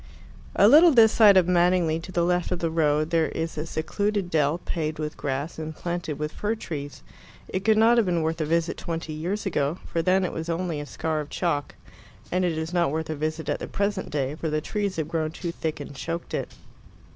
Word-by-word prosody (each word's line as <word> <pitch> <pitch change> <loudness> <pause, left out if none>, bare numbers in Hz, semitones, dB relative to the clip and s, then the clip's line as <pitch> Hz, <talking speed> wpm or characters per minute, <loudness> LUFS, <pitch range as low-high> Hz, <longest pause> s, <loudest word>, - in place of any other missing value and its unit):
II - - +6
A - - +9
little 330 +4 +8
this 225 -5 +6
side 210 -4 +7
of 180 -2 +4
Madingley, 175 -2 +3
to 180 +3 -9
the 175 -1 +1
left 180 0 +1
of 180 - 0
the 165 -1 -2
road, 155 -1 +1
there 165 -1 +3
is 165 0 -4
a 155 +1 -4
secluded 200 +4 -2
dell, 150 0 +2
paved 155 -3 -3
with 155 0 -4
grass 140 +4 -3
and 155 0 -5
planted 170 -4 -4
with 150 0 -3
fir 210 +2 -2
trees. 145 -9 -7 0.4
It 185 - -3
could 220 0 +4
not 230 +2 +5
have 225 -4 +3
been 170 -2 +1
worth 160 +1 -1
a - - 0
visit 165 +2 0
twenty 165 -2 -4
years 180 +8 -3
ago, 150 -3 0
for 165 - -1
then 185 +2 +2
it - - -4
was 160 +1 -5
only 170 -2 -2
a 145 - -6
scar 160 +1 -2
of 150 -1 -5
chalk, 145 -6 -2 0.6
and 180 +1 +1
it 170 -3 0
is 160 +2 -4
not 175 -3 +2
worth 160 +2 -3
a - - -2
visit 155 +1 -3
at - - -1
the - - -5
present 200 -1 -2
day, 140 -2 -1
for 160 +1 -3
the 155 0 0
trees 200 +4 -2
have 160 -2 -2
grown 160 -1 -1
too 170 +2 -5
thick 160 -2 -4
and 145 -1 -8
choked 165 +5 -5
it. - - -3
165 Hz, 235 wpm, -25 LUFS, 155-180 Hz, 0.6 s, A